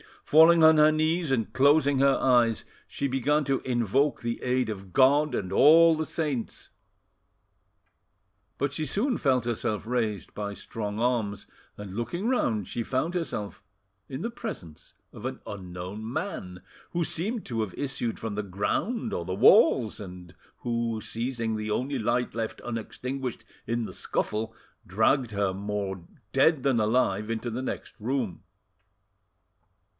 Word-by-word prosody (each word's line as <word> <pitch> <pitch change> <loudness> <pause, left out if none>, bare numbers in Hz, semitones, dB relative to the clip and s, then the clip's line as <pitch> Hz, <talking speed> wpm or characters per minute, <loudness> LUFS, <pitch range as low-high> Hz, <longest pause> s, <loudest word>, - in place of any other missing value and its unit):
Falling 160 +2 +6
on 160 0 +7
her 150 0 +6
knees 160 +1 +1
and 115 -5 0
closing 140 +2 +4
her 140 0 +4
eyes, 120 -4 +3 0.2
she 140 - -4
began 140 +3 +1
to 135 -1 0
invoke 125 +3 +1
the 115 0 -3
aid 125 -1 0
of 95 -3 -7
God 145 +3 +4
and 95 -1 -3
all 165 +9 +7
the 160 0 -2
saints. 145 -9 -3 1.9
But 140 0 -1
she 155 +2 -3
soon 220 - 0
felt 130 -5 +2
herself 110 -3 -2
raised 110 -5 -2
by 100 -1 -4
strong 105 0 -5
arms, 115 -4 0 0.3
and 105 -2 -8
looking 170 - -3
round, 110 - 0
she 120 - -3
found 130 +8 -1
herself 135 - -4 0.5
in 135 +2 -6
the 230 - -3
presence 140 - -8 0.2
of - - -10
an - - -4
unknown 95 +3 -7
man, 90 - -5 0.3
who 170 -1 0
seemed 205 +8 -3
to 115 -3 -3
have 110 -4 -3
issued 135 -5 -2
from 110 -2 -5
the 105 - -1
ground 100 - -2
or 85 - -3
the 95 +1 -3
walls, 110 +3 +5
and 90 -4 -10 0.3
who, 115 -2 -2
seizing 115 -1 -3
the 105 0 -4
only 130 +6 -1
light 120 +3 0
left 115 -1 -4
unextinguished 125 +2 -5 0.2
in 115 0 -1
the - - -8
scuffle, 110 +1 -2 0.3
dragged 110 +6 +2
her 100 -2 0
more 100 -2 -4 0.3
dead 135 +2 +3
than 135 -4 +2
alive 105 -2 +1
into 115 +1 -3
the 120 +3 -3
next 130 - -6
room. 120 -3 -2
120 Hz, 150 wpm, -27 LUFS, 105-140 Hz, 1.9 s, on